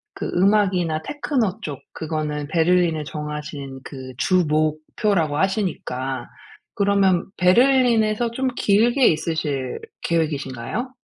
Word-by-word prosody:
그 - - -4
음악이나 185 -4 +2
테크노 240 - -1
쪽 145 -7 -5
그거는 150 -2 -3
베를린을 165 0 +2
정하신 150 -2 -6
그 130 -2 -9
주목표라고 155 +1 +1
하시니까 150 - -2 0.5
그러면 200 -4 +2
베를린에서 235 +2 +3
좀 265 +3 -1
길게 235 +6 +3
있으실 150 -5 -2 0.2
계획이신가요? 160 - -2
170 Hz, 265 characters per minute, -22 LUFS, 150-210 Hz, 0.5 s, 베를린에서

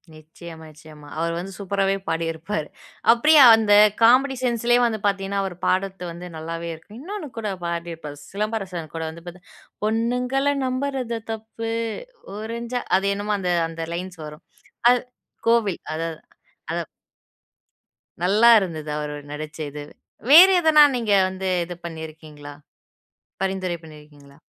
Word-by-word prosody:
நிச்சயமா, 160 +1 -12
நிச்சயமா. 150 -1 -15
அவரு 165 0 -1
வந்து 185 +3 -6
சூப்பராவே 195 0 0
பாடிருப்பாரு. 165 0 -3 0.4
அப்டியே 300 +6 +6
அந்த 220 -2 0 0.3
காமெடி 260 +4 +5
சென்ஸ் 235 -2 0
லையே 240 0 +6
வந்து 220 -2 -1
பாத்தீங்கன்னா 195 0 -1
அவரு 190 -2 -4
பாடற்து 190 0 0
வந்து 175 +1 -9
நல்லாவே 165 +1 -5
இருக்கும். 205 +9 -13
இன்னொன்னு 390 0 -6
கூட 215 -2 -3 0.2
பாடிருப்பாரு 170 -3 -5
சிலம்பரசன் 195 -6 -4
கூட 165 - -3
வந்து 165 +1 -11
பார்த்த 180 +1 -10 0.4
பொண்ணுங்கள 250 +5 0
நம்பறது 255 -2 -2
தப்பு. 225 +1 -6 0.7
ஒரஞ்சா 235 +3 -4 0.2
அது 195 +1 -1
என்னமோ 205 +1 -2
அந்த 180 -2 -1 0.2
அந்த 165 0 -7
லைன்ஸ் 180 0 -7
வரும். 150 +2 -11 0.5
அது 245 -1 +4 0.5
கோவில். 230 -5 +2
அதா 165 +1 -2
அதா 160 - -9 0.6
அதான். - - -13 1.4
நல்லா 215 +6 +5
இருந்துது 160 -6 -5
அவரு 150 0 -4 0.2
நடிச்ச 155 +1 -7
இதுவு. 145 0 -9 0.4
வேற 340 +5 +11
எதனா, 315 -3 +6
நீங்க 225 -4 0 0.2
வந்து 190 0 -4 0.2
இது 175 +1 -7
பண்ணீருக்கீங்களா? 155 -3 -9 0.9
பரிந்துரை 190 -2 -1
பண்ணியிருக்கீங்களா? 150 -3 -15
190 Hz, 130 wpm, -23 LUFS, 160-230 Hz, 1.4 s, வேற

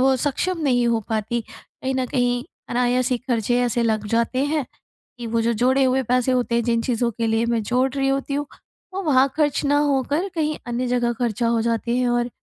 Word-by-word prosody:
वो 265 0 +4
सक्षम 300 +7 -1
नहीं 245 -4 +2
हो 230 -1 +1
पाती। 220 +2 -1
कहीं 225 +4 -7
न 260 -1 0
कहीं 245 -1 0 0.3
अनायास 250 +1 +1
ही 250 - +1
खर्चे 245 -1 0
ऐसे 240 -1 +1
लग 215 -2 0
जाते 235 +4 +1
हैं 290 -2 -1 0.5
कि 235 - -5
वो 230 0 0
जो 235 +1 +1
जोड़े 260 +4 +2
हुए 260 +1 +2
पैसे 250 +1 +1
होते 245 -2 0
हैं 235 - +2
जिन 230 -1 +1
चीज़ों 240 -1 0
के 230 +1 -2
लिए 225 +1 +1
मैं 230 -2 0
जोड़ 250 +5 +1
रही 270 -1 0
होती 275 +1 -1
हूँ 290 0 -2 0.5
वो 390 - -2
वहाँ 275 -4 +4
ख़र्च 295 -1 +1
ना 290 +1 +3
होकर 285 +7 0
कहीं 310 -2 0
अन्य 240 +1 -2
जगह 245 -1 +1
खर्चा 235 0 -1
हो 230 -1 +2
जाते 235 +1 0
हैं। 250 -1 +1
और 240 0 +1
245 Hz, 215 wpm, -22 LUFS, 235-265 Hz, 0.5 s, वो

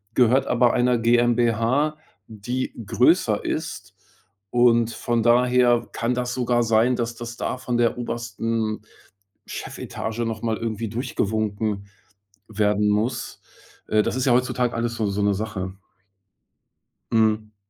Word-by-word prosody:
gehört 130 +2 +4
aber 120 0 +3
einer 125 0 +2
GmbH, 120 +4 +2 0.3
die 120 +4 -4
größer 120 - +2
ist. 145 - -4 0.6
Und 120 -1 +3
von 120 0 -1
daher 120 0 +3
kann 115 +2 -1
das 125 0 -2
sogar 120 -1 +1
sein, 115 +2 +3
dass 120 -1 -3
das 120 +1 -7
da - - -3
von 125 -1 -2
der 120 0 +2
obersten 115 -2 -3 0.7
Chefetage 110 +1 -6
noch 110 -1 -4
mal 115 -2 0
irgendwie 115 -1 -3
durchgewunken 110 -3 -2 0.6
werden 105 -1 +1
muss. 110 +4 -1 0.5
Äh, 110 0 +3
das 115 - -2
ist 130 - 0
ja 130 - +4
heutzutage 125 0 +1
alles 115 0 -2
so 110 -2 -1
so 100 +1 -1
'ne 100 0 +3
Sache. 95 -3 -4 1.4
Mhm. 110 -1 +1
115 Hz, 130 wpm, -23 LUFS, 110-125 Hz, 1.4 s, gehört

